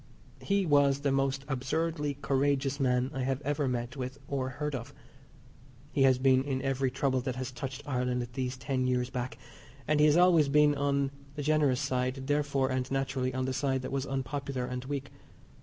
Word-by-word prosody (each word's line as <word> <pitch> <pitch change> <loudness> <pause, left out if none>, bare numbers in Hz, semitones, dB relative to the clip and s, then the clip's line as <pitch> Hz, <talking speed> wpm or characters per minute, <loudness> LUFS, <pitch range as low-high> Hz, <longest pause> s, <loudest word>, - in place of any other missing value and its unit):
He 200 -1 +1
was 140 -3 +4
the 140 -1 +1
most 135 0 0
absurdly 150 +2 -1
courageous 140 0 +1
man 125 0 +1
I 135 - -3
have 130 0 0
ever 145 0 -1
met 120 0 -2
with 130 0 -5
or 130 -2 -2
heard 150 +3 -4
of. 120 -3 -6 1.0
He 145 - 0
has 130 -1 +5
been 130 0 +4
in 135 -2 -2
every 135 -1 +1
trouble 130 0 0
that 130 -1 -3
has 130 0 -4
touched 135 +1 -6
Ireland 125 -2 -1
these 130 0 -3
ten 130 -1 -1
years 125 0 0
back, 125 0 -4 0.5
and 150 0 +2
he 150 - +6
has 150 +2 +4
always 170 -5 +5
been 150 +1 +5
in 145 - -2
on 140 -1 +1 0.2
the 145 - -4
generous 145 -3 +2
side, 130 -1 -1
therefore, 140 -2 +1
and 130 0 -1
naturally, 135 -1 -1
on 130 0 -2
the 130 - -1
side 130 -1 0
that - - -5
was 135 0 -2
unpopular 135 -1 -3
and 125 0 -5
weak. 140 0 -4
135 Hz, 190 wpm, -30 LUFS, 130-145 Hz, 1.0 s, he